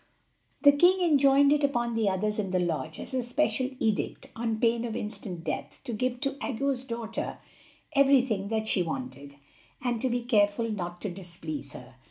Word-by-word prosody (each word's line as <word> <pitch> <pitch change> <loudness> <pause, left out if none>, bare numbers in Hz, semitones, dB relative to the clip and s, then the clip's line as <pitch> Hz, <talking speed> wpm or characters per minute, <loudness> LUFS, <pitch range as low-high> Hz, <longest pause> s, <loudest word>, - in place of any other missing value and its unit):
The 285 - +9
king 355 +6 +5
enjoined 280 -1 +5
it 300 0 +1
upon 240 -4 +1
the 225 -3 +2
others 210 +3 -1
in 200 -3 -1
the 185 - +1
lodge 160 -2 -2
as - - -8
a 260 - +1
special 250 0 0
edict, 220 -2 -1
on 225 -1 -2
pain 230 0 +2
of 230 -2 -3
instant 200 -5 -5
death, - - -4
to 240 - -5
give 250 +3 -1
to 275 -1 +1
Aggo's 270 0 -1
daughter 230 -2 -4 0.6
everything 265 -8 +3
that 220 0 -1
she 195 - +2
wanted, 160 - -5 0.4
and 240 -3 -1
to 260 - +1
be 245 0 -1
careful 220 -1 +2
not 175 -4 -5
to 205 - -3
displease 170 -6 -7
her. 130 - -12
230 Hz, 180 wpm, -28 LUFS, 195-260 Hz, 0.6 s, The